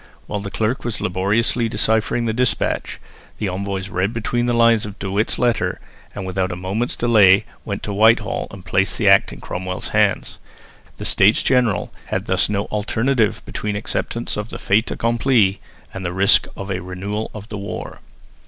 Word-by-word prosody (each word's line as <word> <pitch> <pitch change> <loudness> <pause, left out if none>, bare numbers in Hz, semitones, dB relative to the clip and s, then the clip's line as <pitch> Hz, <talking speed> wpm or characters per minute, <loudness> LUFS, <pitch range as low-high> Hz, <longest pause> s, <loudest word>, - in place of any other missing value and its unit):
While 105 - -3
the 100 0 -5
clerk 110 +5 -1
was 120 -3 -3
laboriously 115 +6 0
deciphering 110 +2 +1
the 110 - 0
despatch, 125 +1 0 0.4
the 105 - -2
envoys 95 0 -3
read 100 +2 -1
between 120 +1 -1
the - - +2
lines 115 -2 +4
of 105 -1 -7
De 95 -1 -4
Witt's 105 +3 0
letter, 115 -7 0 0.4
and 100 - -5
without 95 0 -1
a - - -3
moment's 95 +7 -2
delay 105 -5 +5 0.2
went - - -4
to 105 - -3
Whitehall 110 +1 +3
and 95 -2 -12
placed 95 0 +1
the - - +1
Act - - +5
in - - -10
Cromwell's 90 0 -5
hands. - - +1 0.6
The - - -6
States 105 +3 +4
General 120 -8 +1
had - - -2
thus - - +1
no 100 -1 -1
alternative 110 +2 0
between 105 -1 -4
acceptance 115 +2 -3
of 105 +2 -4
the - - -6
fait 105 +4 +1
accompli 115 -4 +2 0.3
and 95 - -6
the 85 -1 -3
risk 100 +3 +4
of 100 0 -5
a 95 -1 -2
renewal 95 +4 -4
of 105 0 -9
the 105 - -5
war. 100 - -6
105 Hz, 180 wpm, -20 LUFS, 95-115 Hz, 0.6 s, delay